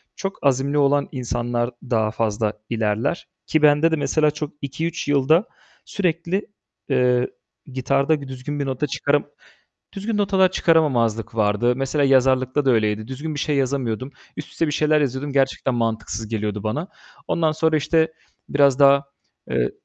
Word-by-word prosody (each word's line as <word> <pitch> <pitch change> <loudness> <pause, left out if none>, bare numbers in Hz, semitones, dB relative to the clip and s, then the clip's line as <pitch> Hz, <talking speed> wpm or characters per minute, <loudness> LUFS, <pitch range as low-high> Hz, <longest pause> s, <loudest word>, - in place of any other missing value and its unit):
çok 195 0 -4
azimli 140 +1 +1
olan 145 0 +2
insanlar 120 -1 -2
daha 110 -3 0
fazla 110 -1 -1 0.2
ilerler 110 - -1 0.2
ki 155 - +1
bende 150 +2 +5
de - - +3
mesela 150 +1 +1
çok 150 0 -5
2-3 160 +5 -4
yılda 145 - +3 0.4
sürekli, 180 +1 -1 0.4
eee, 125 -2 +2 0.3
gitarda 140 +3 0
bir 140 - -8
düzgün 130 +3 -6
bir 140 - -1
nota 135 +2 -2
çıkarım 145 +1 0 0.7
düzgün 205 +2 -3
notalar 190 -2 +3
çıkaramamazlık 115 - +1
vardı. 110 +3 +2
Mesela 135 +2 0
yazarlıkta 130 +1 +3
da 130 - +4
öyleydi. 110 -1 0
Düzgün 145 +4 -5
bir - - -3
şey 150 0 0
yazamıyordum. 130 -2 -1 0.3
Üst 150 - -6
üste 165 - -1
bir - - -1
şeyler 155 0 +2
yazıyordum, 140 +1 -2
gerçekten 135 -1 +1
mantıksız 110 -1 -2
geliyordu 105 -2 -3
bana. 125 - -2 0.4
Ondan 160 -2 +1
sonra 160 0 +1
işte 160 +2 +1 0.4
biraz 140 -1 +3
daha, 140 0 +6 0.5
eee - - +1
140 Hz, 150 wpm, -22 LUFS, 120-150 Hz, 0.7 s, daha